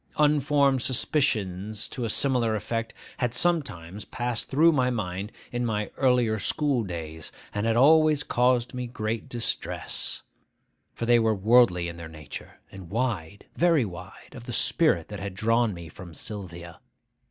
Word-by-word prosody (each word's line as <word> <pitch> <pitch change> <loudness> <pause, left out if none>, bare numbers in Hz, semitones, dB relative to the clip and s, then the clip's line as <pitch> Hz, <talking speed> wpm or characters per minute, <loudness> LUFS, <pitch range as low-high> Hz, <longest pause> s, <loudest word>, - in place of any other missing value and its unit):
Unformed 145 -2 +3
suspicions 110 - 0
to 125 - -5
a - - -2
similar 120 -2 +2
effect 115 +2 -3 0.3
had 120 -1 -1
sometimes 105 - 0
passed 120 -1 -3
through 160 +5 +5
my 130 -5 +2
mind 100 -3 -3 0.2
in 120 0 -2
my 105 -3 -2
earlier 125 -4 +2
school 140 +4 0
days, 80 -4 -6 0.2
and 105 +2 -1
had 115 - +2
always 155 +3 +5
caused 125 -1 +1
me 125 -1 -4
great 110 -1 -4
distress; 120 -2 -2 0.7
for 115 - -3
they 120 0 +5
were 110 -1 +2
worldly 105 -4 +4
in 85 0 -7
their 85 -1 -8
nature, 75 -3 -10
and 95 -3 -11
wide, 100 -5 -3
very 165 -7 +3
wide, 90 -4 -10
of 120 - -11
the 120 - -4
spirit 150 - +2
that 105 -1 -6
had 100 -1 -6
drawn 115 +3 +2
me 85 -3 -8
from 85 +1 -11
Sylvia. 85 -5 -7
115 Hz, 155 wpm, -26 LUFS, 95-125 Hz, 0.7 s, through